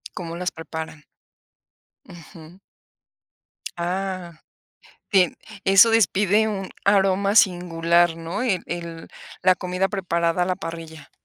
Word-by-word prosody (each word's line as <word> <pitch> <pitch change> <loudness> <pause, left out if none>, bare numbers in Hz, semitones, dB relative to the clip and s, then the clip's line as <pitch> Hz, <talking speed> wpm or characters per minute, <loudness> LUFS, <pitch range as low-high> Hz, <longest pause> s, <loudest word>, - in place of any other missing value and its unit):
Como 170 -2 -6
las 180 0 -2
preparan. 160 -1 -8 1.0
Ujú. 165 +1 -14 1.2
Ah, 180 -1 -4 0.7
tien 185 -4 +3 0.3
eso 195 +4 +7
despide 210 0 +3
un 195 -3 -4
aroma 200 0 +2
singular, 175 -3 +3
¿no? 165 +7 -4
El 195 -8 0
el 170 -1 -7 0.3
la 185 0 +5
comida 180 +1 -2
preparada 175 -3 -1
a - - 0
la 185 0 -1
parrilla. 165 -2 -9
180 Hz, 105 wpm, -23 LUFS, 165-195 Hz, 1.2 s, eso